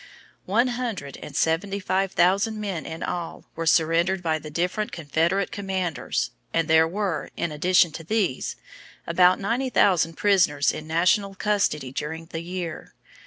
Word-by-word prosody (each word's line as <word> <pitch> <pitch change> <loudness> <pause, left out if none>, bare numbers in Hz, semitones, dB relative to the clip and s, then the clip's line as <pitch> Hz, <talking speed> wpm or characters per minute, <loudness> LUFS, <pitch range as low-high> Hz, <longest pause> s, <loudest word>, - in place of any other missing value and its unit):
One 235 +7 +3
hundred 230 - -4
and 140 - -10
seventy 185 +6 0
five 190 0 0
thousand 200 +5 +2
men 195 -6 -4
in 160 0 -6
all 175 -2 -4
were 165 0 -3
surrendered 170 +3 +2
by 160 -2 0
the 155 - -9
different 180 +7 -1
Confederate 170 +5 0
commanders, 190 -5 -2 0.2
and 165 -1 +1
there 160 0 +5
were, 190 -1 -2
in 170 - -1
addition 175 +2 +3
to 165 - -8
these, 190 - -1 0.5
about 180 +2 +4
ninety 230 +7 -1
nine 260 - -3
thousand 170 -4 +3
prisoners 175 -8 +3
in 155 - -7
national 185 +5 +2
custody 190 -10 0
during 160 +4 -5
the 165 0 -6
year. 175 -1 -6
175 Hz, 155 wpm, -25 LUFS, 160-195 Hz, 0.5 s, there